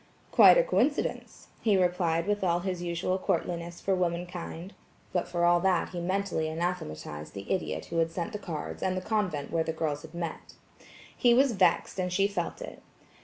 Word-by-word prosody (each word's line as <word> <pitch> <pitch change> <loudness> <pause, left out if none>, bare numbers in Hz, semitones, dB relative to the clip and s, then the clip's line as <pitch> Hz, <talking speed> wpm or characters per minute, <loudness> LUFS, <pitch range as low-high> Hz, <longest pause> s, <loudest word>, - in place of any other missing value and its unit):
"Quite - - +8
a - - +5
coincidence," - - -1
he 210 -4 +3
replied 175 -2 +1
with 205 0 0
all 175 -1 +2
his 180 -1 -3
usual 175 +2 -1
courtliness 170 -2 -2
for 195 - 0
womankind; 175 0 -3 0.4
but 180 - 0
for 175 -1 0
all 175 0 +5
that 180 -1 +1
he 180 - -5
mentally 185 -2 -1
anathematized 160 - -4
the 100 0 -6
idiot 190 - -1
who 170 - -2
had 165 0 +2
sent 175 +6 -4
the 210 - -4
cards 165 -6 -6
and 185 0 0
the - - -2
convent 185 -8 -1
where 165 -1 +1
the 160 - -3
girls 155 -2 -2
had - - -12
met. 170 -2 -6 0.6
He 240 -1 +4
was 265 +1 +4
vexed, 190 -2 +2
and 180 0 -1
she 195 +2 +3
felt 205 - -4
it. - - -9
175 Hz, 185 wpm, -29 LUFS, 170-190 Hz, 0.6 s, Quite